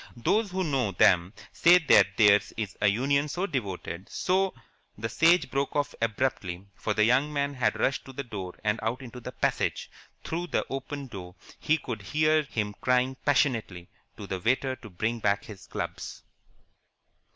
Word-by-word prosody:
Those 210 Hz, -, +1 dB
who 185 Hz, +1 st, -1 dB
know 135 Hz, -, 0 dB
them 90 Hz, 0 st, +4 dB, 0.2 s
say 175 Hz, +2 st, +6 dB
that 165 Hz, -4 st, +4 dB
theirs 105 Hz, -2 st, +5 dB
is 105 Hz, -3 st, -4 dB
a 105 Hz, -, +4 dB
union 140 Hz, +8 st, +2 dB
so 175 Hz, +6 st, -2 dB
devoted, 100 Hz, -, -4 dB
so 190 Hz, -1 st, 0 dB, 0.2 s
" -, -, -41 dB
The 115 Hz, +2 st, -3 dB
Sage 170 Hz, +6 st, +3 dB
broke 140 Hz, +1 st, -1 dB
off 145 Hz, -1 st, 0 dB
abruptly, 105 Hz, -6 st, -1 dB
for 105 Hz, -, -3 dB
the 105 Hz, -, +4 dB
young 130 Hz, +6 st, +3 dB
man 140 Hz, -1 st, -1 dB
had 125 Hz, -, 0 dB
rushed 135 Hz, -, 0 dB
to 135 Hz, -, -10 dB
the 140 Hz, -, -4 dB
door 95 Hz, -7 st, -7 dB
and 105 Hz, +1 st, +1 dB
out 120 Hz, +4 st, -2 dB
into 125 Hz, 0 st, -9 dB
the 120 Hz, -, -7 dB
passage. -, -, -1 dB, 0.3 s
Through 175 Hz, +2 st, -3 dB
the -, -, -1 dB
open 135 Hz, +1 st, -5 dB
door 95 Hz, -7 st, -9 dB, 0.2 s
he 160 Hz, -, +2 dB
could 120 Hz, -7 st, -6 dB
hear 155 Hz, +9 st, +2 dB
him 105 Hz, -7 st, -3 dB
crying 125 Hz, +1 st, +2 dB
passionately 115 Hz, -11 st, +1 dB, 0.3 s
to 105 Hz, -, -7 dB
the 95 Hz, -1 st, -4 dB
waiter 130 Hz, +6 st, +1 dB
to 110 Hz, -, -12 dB
bring 110 Hz, +6 st, -2 dB
back 100 Hz, -2 st, +1 dB
his 105 Hz, -4 st, -11 dB
clubs. -, -, -6 dB
125 Hz, 175 wpm, -28 LUFS, 105-145 Hz, 0.3 s, say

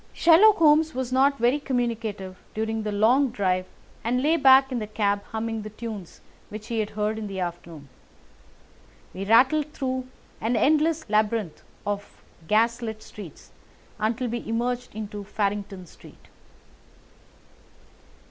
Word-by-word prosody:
Sherlock 370 Hz, +6 st, +6 dB
Holmes 315 Hz, -2 st, +4 dB
was 255 Hz, -1 st, -3 dB
not 275 Hz, +2 st, +3 dB
very 245 Hz, +4 st, +2 dB
communicative 230 Hz, -8 st, -3 dB, 0.2 s
during 220 Hz, 0 st, -2 dB
the 215 Hz, -1 st, -3 dB
long 240 Hz, +7 st, +3 dB
drive 185 Hz, -5 st, -1 dB, 0.4 s
and 250 Hz, +3 st, 0 dB
lay 315 Hz, +3 st, +3 dB
back 270 Hz, -2 st, +6 dB
in 250 Hz, -, -1 dB
the 215 Hz, -, -5 dB
cab 205 Hz, -1 st, 0 dB
humming 225 Hz, 0 st, -4 dB
the 215 Hz, -, -7 dB
tunes 215 Hz, -4 st, -8 dB, 0.3 s
which 215 Hz, 0 st, -9 dB
he 230 Hz, -2 st, -1 dB
had 215 Hz, -1 st, -1 dB
heard 215 Hz, +1 st, -2 dB
in 215 Hz, -, -5 dB
the 195 Hz, -1 st, -5 dB
afternoon. 170 Hz, -4 st, -6 dB, 1.3 s
We 195 Hz, +1 st, -5 dB
rattled 270 Hz, +8 st, +4 dB
through 260 Hz, -2 st, -3 dB, 0.3 s
an 230 Hz, +3 st, 0 dB
endless 310 Hz, +5 st, +2 dB
labyrinth 215 Hz, -4 st, 0 dB, 0.2 s
of 205 Hz, 0 st, -5 dB, 0.2 s
gas 230 Hz, +4 st, +2 dB
lit 220 Hz, -2 st, -6 dB
streets 195 Hz, -8 st, -12 dB, 0.5 s
until 225 Hz, +4 st, -1 dB
we 240 Hz, +1 st, -3 dB
emerged 240 Hz, +1 st, -2 dB
into 210 Hz, -1 st, -6 dB
Farrington 200 Hz, -2 st, -3 dB
Street. -, -, -17 dB
225 Hz, 140 wpm, -25 LUFS, 205-255 Hz, 1.3 s, Sherlock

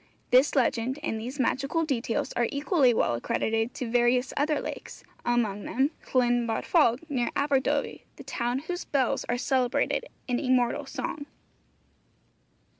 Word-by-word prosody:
This 260 Hz, +5 st, +5 dB
legend 255 Hz, 0 st, +1 dB
and 220 Hz, -, -2 dB
these 255 Hz, +5 st, -6 dB
magical 275 Hz, +6 st, 0 dB
details 235 Hz, -6 st, -1 dB
are 240 Hz, -1 st, +1 dB
equally 280 Hz, -2 st, +3 dB
well 220 Hz, -, +1 dB
accredited 225 Hz, -, -1 dB
to 250 Hz, -, -4 dB
various 245 Hz, +2 st, +2 dB
other 295 Hz, 0 st, +1 dB
lakes, -, -, -7 dB, 0.2 s
among 220 Hz, -4 st, 0 dB
them 270 Hz, +4 st, +1 dB, 0.2 s
Llyn 245 Hz, -2 st, +2 dB
Barfog, 240 Hz, +3 st, +2 dB
near 255 Hz, -6 st, -1 dB
Aberdovey, 280 Hz, -2 st, 0 dB
the -, -, -11 dB
town 240 Hz, +1 st, -2 dB
whose 355 Hz, +1 st, -3 dB
'bells' 265 Hz, -4 st, 0 dB
are 245 Hz, -, +1 dB
celebrated 260 Hz, -, 0 dB, 0.2 s
in 245 Hz, -1 st, 0 dB
immortal 255 Hz, +1 st, +1 dB
song. 285 Hz, +2 st, -5 dB
250 Hz, 135 wpm, -27 LUFS, 240-280 Hz, 0.2 s, This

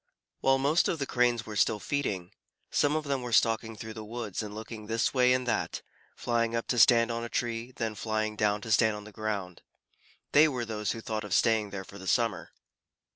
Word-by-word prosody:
While 135 Hz, 0 st, +3 dB
most 145 Hz, +5 st, +2 dB
of 170 Hz, -, 0 dB
the 140 Hz, -, -2 dB
Cranes 120 Hz, -3 st, +1 dB
were 105 Hz, -, -7 dB
still 105 Hz, +2 st, +2 dB
feeding, 100 Hz, -10 st, -2 dB, 0.4 s
some 145 Hz, +1 st, +2 dB
of 155 Hz, -, 0 dB
them 140 Hz, -2 st, -1 dB
were 125 Hz, -1 st, -5 dB
stalking 115 Hz, 0 st, +2 dB
through 110 Hz, +1 st, -7 dB
the 110 Hz, -1 st, -7 dB
woods 110 Hz, -2 st, -5 dB
and 105 Hz, -1 st, -7 dB
looking 110 Hz, -1 st, -8 dB
this 115 Hz, +1 st, 0 dB
way 125 Hz, -1 st, +4 dB
and 125 Hz, 0 st, +1 dB
that, 110 Hz, -, -1 dB, 0.3 s
flying 115 Hz, -1 st, 0 dB
up 115 Hz, -, -1 dB
to 120 Hz, -, +1 dB
stand 115 Hz, 0 st, +6 dB
on 115 Hz, 0 st, -3 dB
a 120 Hz, -, -5 dB
tree, 115 Hz, -1 st, -2 dB
and 125 Hz, +1 st, -19 dB
then 115 Hz, -2 st, -2 dB
flying 110 Hz, +1 st, -2 dB
down 105 Hz, -1 st, +1 dB
to 115 Hz, -, -6 dB
stand 110 Hz, 0 st, +4 dB
on 105 Hz, -, -8 dB
the 105 Hz, -, -12 dB
ground. 100 Hz, -4 st, -4 dB, 0.7 s
They 150 Hz, +2 st, +7 dB
were 125 Hz, -5 st, -2 dB
those 105 Hz, -2 st, -2 dB
who 115 Hz, -, -7 dB
thought 110 Hz, -1 st, -3 dB
of 100 Hz, -3 st, -1 dB
staying 110 Hz, -2 st, +3 dB
there 100 Hz, -1 st, -6 dB
for 100 Hz, -, -12 dB
the 95 Hz, -, -9 dB
summer. 115 Hz, -3 st, +1 dB
115 Hz, 225 wpm, -29 LUFS, 105-120 Hz, 0.7 s, They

